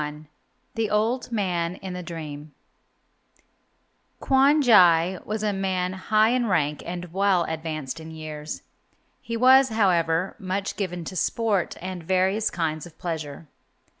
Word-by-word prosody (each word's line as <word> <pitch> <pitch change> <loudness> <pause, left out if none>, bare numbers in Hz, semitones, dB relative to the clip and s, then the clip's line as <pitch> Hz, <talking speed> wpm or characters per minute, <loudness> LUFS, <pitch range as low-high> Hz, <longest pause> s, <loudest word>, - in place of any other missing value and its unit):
XLI 150 +1 -6 0.5
THE 225 -2 -1
OLD 230 +4 0
MAN 180 -5 -1
IN 190 -1 -7
THE 180 - -5
DREAM 155 -3 -8 1.6
Kwon 275 +3 +4
Jai 180 -6 +5
was 215 0 -3
a 210 -1 +1
man 185 -1 -1
high 215 +4 +2
in 245 -1 +1
rank 150 -6 0
and 175 -1 -6
well 195 -2 +3
advanced 160 -3 -4
in 160 0 -9
years. 155 -1 -7 0.6
He 230 0 -4
was, 260 +2 +6
however, 180 -5 +1
much 190 +1 -3
given 180 -4 -3
to 185 - -7
sport 205 0 0
and 185 0 -6
various 190 +5 +1
kinds 160 -1 -3
of 170 - -18
pleasure. 160 -3 -5
180 Hz, 135 wpm, -25 LUFS, 160-210 Hz, 1.6 s, was